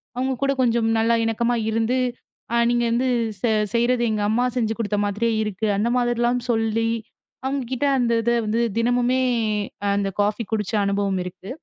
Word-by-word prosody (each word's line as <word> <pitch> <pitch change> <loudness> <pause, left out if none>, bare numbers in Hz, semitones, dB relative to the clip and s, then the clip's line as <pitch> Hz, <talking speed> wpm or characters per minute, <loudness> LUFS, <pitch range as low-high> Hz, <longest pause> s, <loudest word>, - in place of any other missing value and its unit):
அவங்க 260 +1 0
கூடக் 275 -1 +1
கொஞ்சம் 230 -2 +2
நல்லா 230 +1 +3
இணக்கமா 230 +2 0
இருந்து, 225 +3 +1 0.6
அ - - +2
நீங்க 240 0 +2
வந்து 245 +3 +1 0.4
வ - - +3 0.3
செய்யறது 240 +1 +2
எங்க 215 -1 -1
அம்மா 235 +3 +2
செஞ்சு 225 -2 +1
கொடுத்த 210 -2 -1
மாதிரியே 215 +3 0
இருக்கு, 210 +1 -2
அந்த 220 - +1
மாதிரி 240 -1 0
எல்லாம் 245 +1 +1
சொல்லி 225 0 0 0.6
அவங்ககிட்ட 265 0 -2
அந்த 240 -2 +1
இத 235 +1 +1
வந்து 220 +2 0 0.2
தினமுமே 245 +2 +2 0.7
அந்த 200 -1 0
காஃபி 210 +3 0
குடிச்ச 210 -2 -1
அனுபவம் 200 -1 0
இருக்கு. 180 +2 -9
230 Hz, 160 wpm, -23 LUFS, 215-245 Hz, 0.7 s, நல்லா